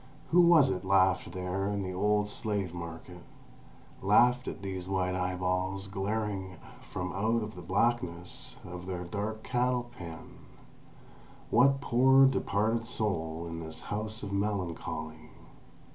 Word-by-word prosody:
Who 175 +2 +7
was 170 -5 +6
it 90 0 -3
laughed 95 -1 +3
there 95 +1 -2
in 100 -1 -1
the 95 0 -4
old 105 +2 +2
slave 100 -4 -2
market 85 +1 -8 0.8
—laughed 125 +6 +4
at 100 - -6
these 95 -2 -4
white 95 -1 0
eyeballs 90 +1 -1
glaring 100 -1 -3 0.4
from 90 0 -3
out 110 +4 +1
of 105 0 -6
the 90 - -9
blackness 90 -2 -1
of 90 0 -8
their 90 -2 -3
dark 105 +5 -4
cattle 125 -1 0
pen? 85 -5 -9 1.1
What 135 +2 +5
poor 135 +2 +6
departed 115 -3 +1
soul 85 -8 -2
in 80 0 -5
this 80 -1 -5
House 110 +1 -3
of 100 -1 -4
Melancholy? 85 -6 -3
95 Hz, 130 wpm, -30 LUFS, 90-110 Hz, 1.1 s, Who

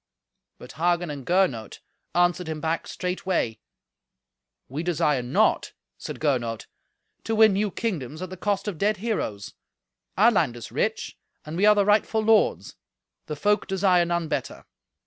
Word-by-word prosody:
But - - -12
Hagen 175 0 +1
and 140 -3 -8
Gernot 170 - 0 0.4
answered 175 0 +2
him 160 -1 -4
back 160 +2 -2
straightway. 180 - -2 1.1
"We 140 +5 -4
desire 165 -5 +1
not," 120 +1 +1 0.3
said - - -7
Gernot, 120 -7 -1 0.6
"to 225 - -1
win 220 -2 +6
new 205 +2 0
kingdoms 155 - -4
at 185 - -7
the - - -5
cost 200 +2 -2
of 185 -7 -4
dead 210 +1 +1
heroes. 185 - -3 0.6
Our 220 +5 +6
land 155 - +1
is 120 - -9
rich, - - -2 0.3
and 155 +1 -6
we 200 +4 +3
are 210 - +7
the 205 -1 +3
rightful 215 +1 +2
lords. 220 0 +2 0.5
The 150 - -4
folk 205 +8 +1
desire 190 -2 +3
none 170 -1 -1
better." - - -4
175 Hz, 150 wpm, -25 LUFS, 150-205 Hz, 1.1 s, are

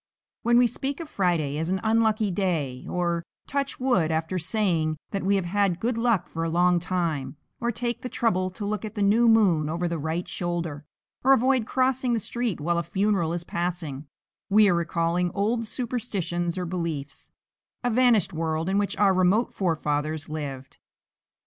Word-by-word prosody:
When 240 0 +3
we 245 - +6
speak 270 +5 -3
of 335 - -6
Friday 170 - 0
as 160 +2 -2
an 190 +1 0
unlucky 220 -2 +2
day, 160 -10 -2
or 170 -1 0 0.2
touch 280 0 -2
wood 245 -11 +2
after 160 +3 -1
saying 170 -4 0
that 195 - -2
we 200 +1 +2
have 190 -2 0
had 190 -1 +1
good 235 +4 0
luck 230 -4 +1
for 165 - -4
a 165 - -1
long 175 +1 +3
time, 165 -5 -2 0.2
or 235 0 0
take 240 +1 -3
the 250 - -5
trouble 185 -7 +1
to 195 +3 -6
look 210 0 -2
at 215 0 -6
the 205 - 0
new 225 +4 +4
moon 190 -9 +4
over 170 +2 -1
the 170 -1 -2
right 160 +4 -2
shoulder, 170 -4 -3 0.4
or 270 +1 +6
avoid 255 -2 +2
crossing 255 -1 +1
the 230 - +1
street 235 -2 -2
while 170 +3 0
a - - +1
funeral 190 0 0
is 170 0 -3
passing, 170 -5 -4 0.4
we 210 +1 +6
are 185 - +4
recalling 170 +1 0
old 225 +3 0
superstitions 200 -9 -2
or 180 - -2
beliefs, 165 -5 -5 0.5
a 245 - +1
vanished 240 -5 +3
world 160 +1 -1
in 195 +1 +2
which 200 -1 -1
our 195 -1 +4
remote 185 +6 +2
forefathers 155 -4 -1
lived. 140 -4 -6
185 Hz, 180 wpm, -26 LUFS, 165-220 Hz, 0.5 s, we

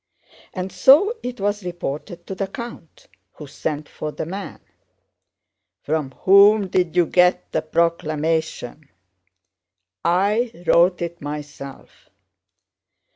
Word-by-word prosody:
And 185 0 -4
so 280 - +5
it 250 -2 -6
was 205 +1 -1
reported 175 0 -6
to - - -6
the 195 +1 -3
count, 235 - -10 0.3
who 150 - -10
sent 150 +1 -4
for 155 - -6
the - - -5
man. 195 +4 -7 1.2
'From 155 -2 -1
whom 200 +1 +6
did 180 -2 0
you 175 -1 +4
get 180 +2 +2
the 160 - 0
proclamation?' 155 -3 -1 1.1
'I 200 +3 +1
wrote 175 +1 +4
it 170 0 -6
myself. 145 -2 -9
175 Hz, 110 wpm, -21 LUFS, 155-195 Hz, 1.2 s, whom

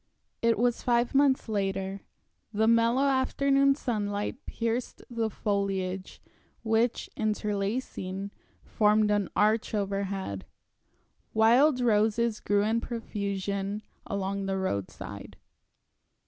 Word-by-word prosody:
It 230 -1 +3
was 240 +1 +1
five 240 -1 +1
months 275 -2 +3
later. 195 -2 -2 0.5
The 220 +1 +1
mellow 230 +3 +4
afternoon 275 0 +3
sunlight 210 -1 -3
pierced 230 +1 -3
the 230 -2 -1
foliage, 195 -2 -2 0.4
which, 225 +1 +1
interlacing, 200 -2 -2 0.3
formed 210 0 +3
an 205 -3 +1
arch 215 +1 +2
overhead. 195 - -3 0.9
Wild 250 +5 +5
roses 220 0 +2
grew 205 0 +1
in 225 +2 +1
profusion 200 -3 -3 0.2
along 200 0 -2
the 195 0 -1
roadside. 100 - -4
215 Hz, 95 wpm, -28 LUFS, 200-235 Hz, 0.9 s, Wild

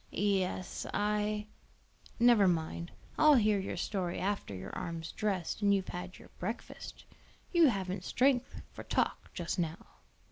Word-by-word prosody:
"Yes, 190 -2 -1
I 210 0 0 0.4
" - - -26
"Never 210 -5 +6
mind; 170 0 -1 0.3
I'll 305 -1 +8
hear 215 -4 +4
your 190 - -4
story 180 -1 -2
after 195 - -2
your 95 +1 -7
arm's 165 -1 -4
dressed 195 -3 -2
and 200 -1 +5
you've 190 -1 -2
had 180 +1 -6
your - - -15
breakfast. 220 +6 -6 0.5
You 340 -3 +6
haven't 190 -5 -1
strength 255 +2 +1
for - - -9
talk - - 0
just 175 +1 -2
now." 165 -1 -1
195 Hz, 145 wpm, -32 LUFS, 175-210 Hz, 0.5 s, I'll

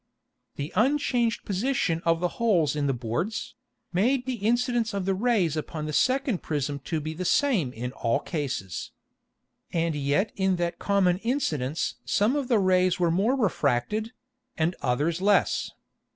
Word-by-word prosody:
The 145 +2 -5
unchanged 240 0 +1
Position 200 -5 0
of 165 0 +2
the 180 - +2
holes 170 - +3
in 145 -1 0
the - - +2
Boards, 125 - -3 0.4
made 245 +8 +2
the 260 -2 -2
Incidence 235 0 +1
of 195 -2 -2
the 195 - +1
Rays 195 -6 +1
upon 155 0 -4
the 155 - -4
second 255 - +1
Prism 145 -2 -2
to 160 - -1
be 155 +1 -4
the 175 +3 -4
same 200 - +2
in 125 +1 -5
all 115 -3 0
cases. 130 - -4 0.8
And 165 -1 0
yet 145 +9 0
in 190 -2 +1
that 175 -1 -2
common 190 -3 +2
Incidence 165 - -1
some 215 +7 +2
of 285 -3 -1
the 240 -3 +3
Rays 185 -1 +3
were 170 -2 +2
more 205 +10 +2
refracted, 210 - 0 0.5
and 165 +2 +1
others 150 +7 0
less. 205 +1 +2
185 Hz, 155 wpm, -26 LUFS, 150-225 Hz, 0.8 s, holes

